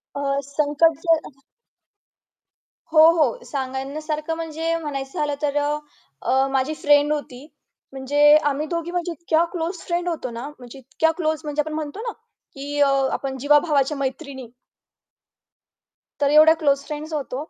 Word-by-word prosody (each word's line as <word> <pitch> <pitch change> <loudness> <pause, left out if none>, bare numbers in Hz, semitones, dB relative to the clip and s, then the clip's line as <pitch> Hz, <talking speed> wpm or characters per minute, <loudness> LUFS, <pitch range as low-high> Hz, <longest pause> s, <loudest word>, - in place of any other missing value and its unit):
अ, 285 - -3 0.3
संकट 300 +2 +2
ज 310 -5 0 1.5
हो, 310 - +5
हो. 305 -8 +1
सांगण्यासारखं 300 +4 -4
म्हणजे 325 0 -2
म्हणायचं 275 -2 -5
झालं 295 -1 0
तर 290 -1 -1
अ, 295 +1 0 0.4
अ, 265 +1 +2
माझी 270 +3 0
फ्रेंड 290 -1 +3
होती. 285 -2 -6 0.4
म्हणजे 290 +3 +4
आम्ही 295 +2 -2
दोघी 335 +1 -3
म्हणजे 350 -1 -2
इतक्या 330 0 +1
क्लोज 345 +1 -3
फ्रेंड 350 0 -1
होतो 310 -7 -4
ना, 235 +4 -6
म्हणजे 245 +2 -11
इतक्या 320 +5 0
क्लोज 315 -2 -1
म्हणजे 300 0 -1
आपण 305 +1 -5
म्हणतो 310 +5 -5
ना, - - -1 0.4
की 285 +1 -5
अ, 280 - +5 0.2
आपण 265 -1 -3
जीवाभावाच्या 295 0 +2
मैत्रिणी. 270 -1 -5 1.7
तर 285 0 +3
एवढ्या 310 +2 +7
क्लोज 280 -3 +1
फ्रेंड्स 305 +1 -6
होतो. 285 +1 -4
295 Hz, 140 wpm, -22 LUFS, 275-320 Hz, 1.7 s, एवढ्या